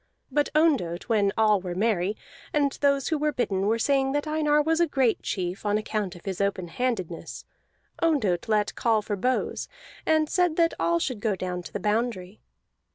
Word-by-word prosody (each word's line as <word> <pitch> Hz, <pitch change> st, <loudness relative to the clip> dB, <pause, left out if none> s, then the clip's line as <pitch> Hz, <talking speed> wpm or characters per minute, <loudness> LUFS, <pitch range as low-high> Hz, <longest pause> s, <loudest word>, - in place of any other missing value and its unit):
But 290 Hz, +2 st, +1 dB
Ondott, 260 Hz, -, +2 dB
when 205 Hz, -3 st, +3 dB
all 215 Hz, -3 st, +4 dB
were 180 Hz, -1 st, -5 dB
merry, 205 Hz, -1 st, 0 dB, 0.4 s
and 285 Hz, -2 st, +2 dB
those 280 Hz, -2 st, +2 dB
who 315 Hz, -2 st, 0 dB
were 300 Hz, 0 st, +1 dB
bidden 200 Hz, -7 st, -1 dB
were 225 Hz, +2 st, +2 dB
saying 270 Hz, +2 st, +1 dB
that 290 Hz, +1 st, 0 dB
Einar 305 Hz, -1 st, +2 dB
was 320 Hz, +2 st, +2 dB
a 340 Hz, -, +4 dB
great 265 Hz, -6 st, +1 dB
chief, 180 Hz, +1 st, -3 dB
on 205 Hz, 0 st, +1 dB
account 210 Hz, -3 st, -3 dB
of 175 Hz, -, -14 dB
his 195 Hz, -1 st, -3 dB
open 195 Hz, -3 st, -1 dB
handedness 190 Hz, -7 st, -3 dB, 0.6 s
Ondott 235 Hz, -, +1 dB
let 210 Hz, -1 st, +1 dB
call 225 Hz, -4 st, +1 dB
for 205 Hz, -, -2 dB
bows, 250 Hz, +6 st, -1 dB, 0.4 s
and 315 Hz, -1 st, +2 dB
said 355 Hz, 0 st, +1 dB
that 335 Hz, 0 st, +3 dB
all 340 Hz, 0 st, +2 dB
should 260 Hz, -9 st, -2 dB
go 215 Hz, -2 st, 0 dB
down 180 Hz, -1 st, -4 dB
to -, -, -10 dB
the -, -, -4 dB
boundary. 210 Hz, -3 st, -2 dB
225 Hz, 185 wpm, -26 LUFS, 195-290 Hz, 0.6 s, all